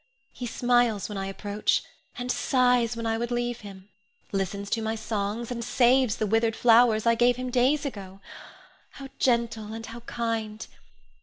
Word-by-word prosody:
He 245 - -6
smiles 240 -3 +1
when 210 - -5
I 195 - -3
approach, 205 +2 -1 0.3
and 250 -1 -2
sighs 245 -3 +2
when 230 - -4
I 225 0 0
would 235 0 -2
leave 240 0 -2
him; 195 -1 -12 0.4
listens 200 +1 -2
to 225 - 0
my 220 0 -2
songs, 220 +1 -3
and 235 -1 -3
saves 245 -1 +3
the 215 - -1
withered 225 +2 +1
flowers 230 -2 +4
I 230 - +5
gave 240 +1 +3
him 255 0 -5
days 265 +4 +2
ago. 195 -7 -7 0.7
How 275 -1 -9
gentle 230 -3 0
and 225 0 -6
how 230 +1 -8
kind! 225 -2 -4
230 Hz, 165 wpm, -26 LUFS, 215-245 Hz, 0.7 s, I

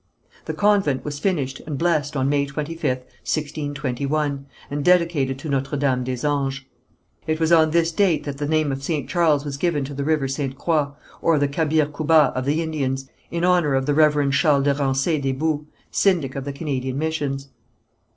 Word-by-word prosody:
The - - -4
convent 200 -10 +2
was 145 -1 -4
finished 145 -7 -1
and 150 -3 -3
blessed 155 -3 0
on 130 0 +1
May 140 0 +1
25th, 150 +4 -5 0.4
1621, 145 -1 -2 0.2
and 145 0 -2
dedicated 165 -7 +2
to 135 - -8
Notre 135 +1 -1
Dame 130 -3 +1
des 125 +1 -3
Anges. 135 -2 0 0.7
It 155 0 0
was 160 0 +1
on 160 -2 +6
this 165 +1 +2
date 170 -4 +2
that 140 -1 -6
the 145 - -1
name 155 -1 +1
of 135 0 -4
St. 145 -2 -2
Charles 155 -5 +2
was 140 -1 -4
given 150 -3 0
to 145 - -7
the 140 0 -3
river 150 -2 +1
Ste. 135 0 -3
Croix, 155 -2 +1 0.3
or 165 -2 +3
the 145 0 +2
Cabir 155 +1 +1
Coubat 150 -1 +3
of 130 0 -2
the 150 +4 +1
Indians, 135 -4 -3 0.2
in 170 +1 -1
honour 175 -6 +3
of 135 0 +1
the 145 - +1
Reverend 150 -2 +3
Charles 140 +1 +3
de 140 0 +3
Ransay 140 +2 0
des 135 -1 0
Boues, 150 +1 -1 0.2
syndic 170 -9 +1
of 135 -1 -4
the 140 - -4
Canadian 135 -3 -3
missions. 145 -3 -2
145 Hz, 190 wpm, -22 LUFS, 135-160 Hz, 0.7 s, on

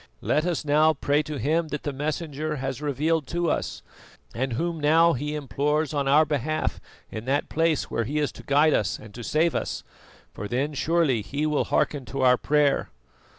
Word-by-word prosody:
Let 155 +3 +1
us 170 -3 -1
now 155 +2 +4
pray 145 +1 +1
to 150 -1 -5
Him 155 +7 0
that 150 -1 -5
the 145 - -3
Messenger 150 +1 -3
has 135 0 -4
revealed 150 +1 0
to 175 -1 0
us, - - -3 0.5
and 130 +1 -2
Whom 165 +6 -2
now 165 +3 +4
he 150 +4 -3
implores 150 +1 -1
on 140 -2 0
our 150 +3 +5
behalf 155 +1 -1 0.3
in 110 +1 -6
that 140 +3 0
place 160 -2 0
where 115 - -1
he 145 +7 -3
is 150 -1 0
to - - -13
guide 145 +3 +4
us 100 -1 0
and 110 -1 -13
to 120 - -8
save 160 +6 +1
us, - - -3 0.5
for 105 - -6
then 135 +7 -1
surely 150 -5 +1
He 140 +8 -3
will 150 -1 +1
hearken 140 -4 0
to 135 +3 -4
our 125 -1 +5
prayer." 150 0 +2
150 Hz, 195 wpm, -25 LUFS, 135-155 Hz, 0.5 s, our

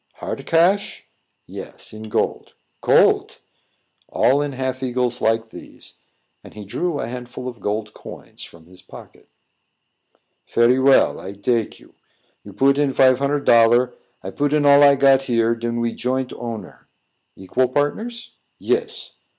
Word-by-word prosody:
"Hard - - -6
cash?" 180 +5 +1 0.4
"Yes, - - -11
in 110 0 -9
gold." - - -2 0.3
"Gold!" - - +3 0.7
"All 135 +3 +2
in 145 -1 -3
half 130 0 -4
eagles 125 -1 -2
like 110 0 0
these." - - -12 0.4
And - - -15
he 105 -1 -9
drew 165 - -3
a - - -4
handful 125 +1 -8
of 120 -3 -8
gold 105 +2 -4
coins - - -12
from 85 -1 -14
his 90 +1 -18
pocket. - - -15 1.2
"Very 120 +2 +3
well; 135 0 +3
I 95 - -8
dake 115 +3 -2
you. - - -21 0.5
You - - -12
put 140 +1 +2
in 140 -2 +1
fife 130 -1 +4
hunnard 140 +1 -1
dollar, 120 +2 +4 0.3
I - - -6
put 145 0 -1
in 150 -1 +2
all 140 0 +6
I 140 -1 +6
got 135 -1 +4
here; 115 -1 +2
den 115 0 -4
we 115 0 -1
joint 130 +1 -3
owner." 115 -2 -8 0.5
"Equal 125 +7 -1
partners?" 215 - -3 0.3
"Yes." 455 -1 -3
125 Hz, 150 wpm, -20 LUFS, 115-140 Hz, 1.2 s, all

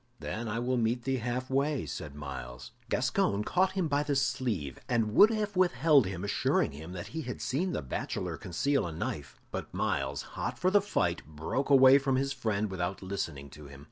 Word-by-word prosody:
"Then 115 +1 -4
I 110 +1 -2
will 125 +2 0
meet 120 +1 0
thee 135 0 0
halfway," 130 +3 -1
said 75 -2 -6
Myles. 60 -4 -7 0.2
Gascoyne 100 +1 +1
caught 185 - +2
him 185 -4 0
by 145 -1 +1
the 145 -1 -1
sleeve, 110 - -1
and 115 -3 +1
would 210 - +8
have 210 -2 -2
withheld 160 - +4
him, 95 -1 -5
assuring 100 - +1
him 80 +5 -9
that 90 -2 -6
he 160 - -4
had 125 -4 -6
seen 175 +8 -1
the - - -2
bachelor 65 - -3
conceal 130 +5 0
a - - -5
knife. 75 -3 -5
But - - -5
Myles, 70 +1 -1
hot - - -3
for 185 +1 +2
the 205 0 +5
fight, 90 - 0
broke 80 - -3
away 135 0 +8
from 135 -1 0
his 135 +1 0
friend 105 -2 -1
without 95 +1 -3
listening 80 -7 -4
to 75 0 -11
him. 70 0 -12
115 Hz, 195 wpm, -30 LUFS, 85-140 Hz, 0.2 s, would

